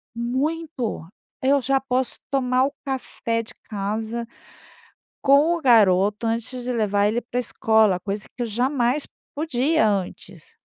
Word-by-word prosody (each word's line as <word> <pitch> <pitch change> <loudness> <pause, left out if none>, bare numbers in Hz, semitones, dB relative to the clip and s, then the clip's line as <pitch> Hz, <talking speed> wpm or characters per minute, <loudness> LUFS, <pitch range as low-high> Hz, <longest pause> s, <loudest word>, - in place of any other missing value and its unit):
Muito. 260 - -2 0.3
Eu 275 +1 +3
já 270 +1 +2
posso 260 -1 -1
tomar 255 -1 +2
o 280 - -3
café 240 -3 -2
de 225 - -11 0.2
casa 220 +3 -3 1.0
com 290 +5 +5
o 335 - -6
garoto 210 -3 +4
antes 230 +2 -2
de 250 +1 -2
levar 205 -3 +1
ele 225 +3 0
pra 245 +1 -3
escola, 220 -5 +3
coisa 200 +2 -4
que 245 - -3
eu - - -1
jamais 250 +4 0 0.3
podia 290 -3 +1
antes. 190 -3 -5
240 Hz, 135 wpm, -23 LUFS, 215-270 Hz, 1.0 s, com